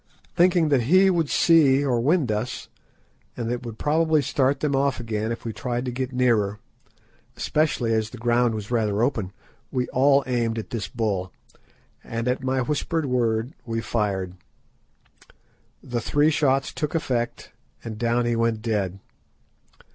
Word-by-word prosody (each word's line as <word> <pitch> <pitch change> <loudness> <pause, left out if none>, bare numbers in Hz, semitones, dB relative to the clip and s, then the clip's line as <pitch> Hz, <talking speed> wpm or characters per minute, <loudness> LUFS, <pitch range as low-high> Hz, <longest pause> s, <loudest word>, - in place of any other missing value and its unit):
Thinking 175 -2 +4
that 130 -5 +2
he 190 +2 +6
would 165 -5 0
see 145 -5 +4
or 125 -3 +1
wind 145 -2 +2
us, 110 +4 -3 0.7
and 115 - -3
that 120 - 0
it 125 0 -5
would 110 -1 -7
probably 155 0 +2
start 135 +1 +1
them 145 -2 0
off 135 -1 +1
again 110 -1 -2
if 115 - -6
we 115 - -3
tried 125 +1 -3
to 125 - -2
get 130 +1 -3
nearer, 115 -5 +1 0.8
especially 145 -7 0
as 110 -1 0
the 125 - -10
ground 120 0 +2
was 105 +1 -6
rather 110 -2 +1
open, 110 -8 -1 0.4
we 125 -1 -1
all 135 +2 +4
aimed 120 -3 -1
at 110 - -6
this 110 -7 -3
bull, 100 -4 -2 0.7
and 115 +1 -4
at 125 +1 -1
my 130 0 0
whispered 150 +4 -1
word, 120 0 0
we 115 -1 -3
fired. 100 -5 -2 1.5
The 120 -2 -3
three 145 +6 +2
shots 135 -3 +1
took 150 0 -3
effect, 125 -7 -2 0.3
and 110 -2 -7
down 120 +1 +1
he 120 0 +1
went 115 -1 0
dead. 100 -5 -1
120 Hz, 160 wpm, -24 LUFS, 115-140 Hz, 1.5 s, he